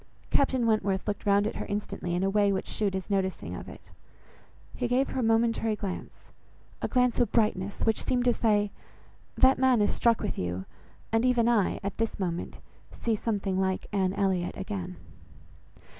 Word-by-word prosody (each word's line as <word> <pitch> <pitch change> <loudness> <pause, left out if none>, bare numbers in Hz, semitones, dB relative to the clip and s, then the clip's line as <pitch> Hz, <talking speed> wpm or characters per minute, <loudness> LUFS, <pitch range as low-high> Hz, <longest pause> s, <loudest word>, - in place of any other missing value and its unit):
Captain 260 -3 +2
Wentworth 205 -4 +1
looked 205 0 -3
round 200 0 +4
at 220 - -3
her - - -4
instantly 200 -4 -3
in 180 - 0
a 195 - +2
way 205 0 +3
which 190 - -1
shewed 200 -3 -1
his 190 - -4
noticing 190 -2 -1
of - - -8
it. - - -14 0.8
He 245 - -1
gave 255 +3 +1
her - - -3
a - - +1
momentary 225 -1 +2
glance, 195 -3 -7 0.5
a - - 0
glance 250 -2 +2
of 240 - +2
brightness, 205 -3 0
which 220 -1 +2
seemed 250 -1 0
to 245 - +4
say, 210 -3 +2 0.6
"That 260 +1 +5
man 260 -2 +4
is 205 - +2
struck 235 -2 +3
with 210 - -3
you, 90 +1 -3 0.5
and 225 +1 +2
even 245 -2 +3
I, 225 -6 +2
at 200 0 -4
this 225 -2 -1
moment, 175 -2 -3 0.3
see 230 -2 -1
something 200 -3 -1
like 190 0 -1
Anne 190 -1 +1
Elliot 185 -3 0
again." 190 -2 -5
210 Hz, 180 wpm, -28 LUFS, 190-230 Hz, 0.8 s, That